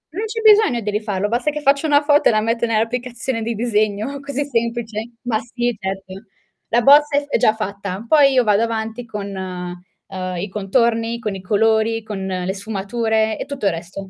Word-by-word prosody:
Non 420 +4 -2
c'è 450 +1 -4
bisogno 425 - +5
di 210 -1 -2
rifarlo, 205 -2 -1
basta 240 +6 0
che 300 0 -4
faccio 280 +2 +2
una 290 0 +4
foto 290 0 +4
e - - +4
la 215 - +2
metto 230 +2 0
nell'applicazione 235 +2 -2
di 230 +1 -2
disegno, 215 +3 -1
così 280 0 -3
semplice. 230 -3 -3
Ma 235 -3 0
sì 240 0 -2
certo. 190 0 -5 0.5
La 240 - +2
bozza 290 +2 +6
è 290 - +1
f - - -15
è - - +2
già 220 -2 +3
fatta, 200 -1 -5
poi 280 -1 +5
io 255 -1 +4
vado 210 -1 +3
avanti 225 +1 -3
con, 210 -2 -5
uhm, 185 0 -7
i 195 +4 -4
contorni, 230 +3 0
con 215 -3 -4
i 190 - -7
colori, 220 +3 +1
con 200 -3 -5
le 185 0 -2
sfumature 220 +2 -1
e - - -4
tutto 280 -5 -5
il 195 - +4
resto 175 +4 -7
225 Hz, 195 wpm, -20 LUFS, 200-245 Hz, 0.5 s, bozza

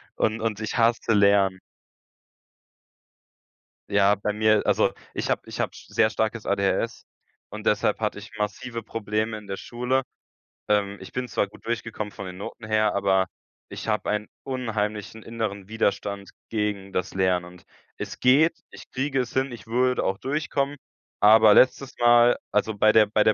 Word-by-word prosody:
und 110 +1 0
und 110 -2 -2
ich 110 - -3
hasse 115 0 +2
Lernen. 100 -2 +4 2.3
Ja, 100 0 +4
bei 105 +1 -2
mir, 110 0 +3
also - - +2 0.2
ich - - -3
hab - - 0
ich - - -8
habe - - 0
sehr - - +1
starkes - - -2
ADHS, - - 0 0.4
und 105 +1 -8
deshalb 105 0 +2
hatte 105 -1 -2
ich 105 - -10
massive 115 +3 -3
Probleme 110 0 -2
in 105 - -11
der 95 - -4
Schule. 125 +4 -1 0.7
Ähm, 100 -1 +1
ich 95 - -10
bin 125 0 -3
zwar 105 -2 0
gut 100 - -18
durchgekommen 115 -2 -3
von 100 - -8
den 90 0 -8
Noten 105 +3 -8
her, 110 -1 +2
aber, 95 -1 +2 0.4
ich - - -6
habe 105 - 0
ein 105 0 -2
unheimlichen 110 -4 -3
inneren 105 -4 -4
Widerstand 100 -2 -2 0.2
gegen 105 -3 -3
das 90 0 -2
Lernen 95 -2 +1
und 90 0 -13 0.3
es - - -7
geht, 150 +6 +4
ich - - -13
kriege 135 +1 -1
es 125 -1 -2
hin, 130 0 0
ich 120 -1 -10
würde 125 +2 +1
auch 95 - 0
durchkommen, 145 0 -2 0.4
aber 110 0 +7
letztes 130 +2 +4
Mal, 120 0 +6 0.2
also 110 - +1
bei 110 +1 +5
der 110 -2 +6
bei 105 0 +2
der 110 - +5
110 Hz, 165 wpm, -25 LUFS, 100-120 Hz, 2.3 s, aber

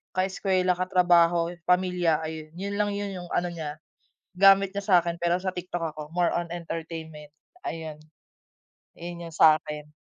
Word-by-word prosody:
kaeskuwela, 185 -1 +1
katrabaho, 175 -2 +3 0.2
pamilya. 180 -3 +2
Ayun, 155 0 -7
yun 200 +3 -4
lang 205 0 +1
yun, 205 0 -3
yung 175 - -11
ano 175 0 0
niya, 155 -2 -6 0.6
gamit 195 +1 +6
niya 200 - -2
sa'kin 170 -3 +3
pero 175 +1 +2
sa 185 0 -2
TikTok 175 -3 -4
ako 155 - -6
more 175 -1 +2
on 175 -1 -2
entertainment 160 -3 -7 0.3
ayun. 160 - -6 1.0
Yung 170 0 -7
yun - - -10
sa'kin. 150 -1 +3
175 Hz, 145 wpm, -26 LUFS, 160-185 Hz, 1.0 s, gamit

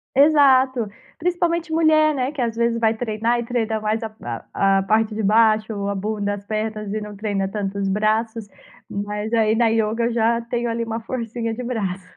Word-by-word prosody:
Exato. 265 -5 +5 0.3
Principalmente 340 -1 0
mulher, 310 -1 +4
né, 260 0 -1
que 300 - -6
às 230 -1 -2
vezes 235 0 +1
vai 225 -1 +3
treinar 230 +1 0
e - - -5
treina 230 -2 -1
mais 215 +2 -1
a 220 - -4 0.4
a 195 0 +3
a - - +1
parte 215 +2 +1
de 220 - -2
baixo, 215 +1 +3
ou 200 0 -3
a 200 - -1
bunda, 205 0 -2
as 200 - -9
pernas, 215 -1 -3
e 215 - -2
não 210 0 -7
treina 200 -1 -2
tanto 200 0 -4
os 195 -1 -1
braços. 215 +2 0 0.4
Mas 210 +2 -4
aí 220 -2 +3
na 235 +1 +3
yoga 225 +1 +1
eu 235 - -1
já 230 0 +2
tenho 240 0 -2
ali 230 0 -2
uma 225 0 -4
forcinha 230 -1 -4
de 250 - -6
braço. 195 -7 -3
225 Hz, 200 wpm, -22 LUFS, 210-240 Hz, 0.4 s, Exato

